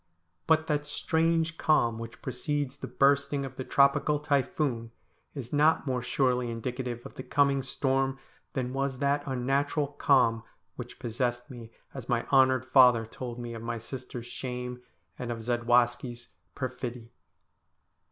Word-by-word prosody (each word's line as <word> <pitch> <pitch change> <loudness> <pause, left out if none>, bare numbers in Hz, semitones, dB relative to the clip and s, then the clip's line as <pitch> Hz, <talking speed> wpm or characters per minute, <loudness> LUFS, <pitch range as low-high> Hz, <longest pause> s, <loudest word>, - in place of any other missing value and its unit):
But 160 -1 +4
that 150 -1 -1
strange 160 +1 0
calm 120 -7 +2
which 115 0 -9
precedes 145 0 -2
the - - -6
bursting 140 0 +2
of 135 - -8
the 130 - -4
tropical 140 +3 +3
typhoon 140 -4 0 0.5
is 130 -3 -7
not 150 +1 +4
more 130 -3 -1
surely 125 0 +1
indicative 120 +1 -4
of - - -9
the - - -7
coming 140 0 +2
storm 135 0 0 0.4
than 125 -1 -2
was 135 -1 -1
that 140 +2 +1
unnatural 135 +3 0
calm 130 -5 +3 0.3
which - - -8
possessed 120 +2 -2
me 120 -3 -9 0.2
as 130 -2 -8
my 120 -1 +1
honoured 130 -1 +4
father 125 -4 +6
told 120 +1 -7
me 120 -1 -6
of 115 - -7
my 115 0 -3
sisters' 120 +1 -7
shame, 125 0 -5 0.4
and 125 -1 -3
of 115 -1 -5
Zadwaski's 120 +1 +1 0.3
perfidy. 125 -3 -5
130 Hz, 140 wpm, -29 LUFS, 120-140 Hz, 0.5 s, father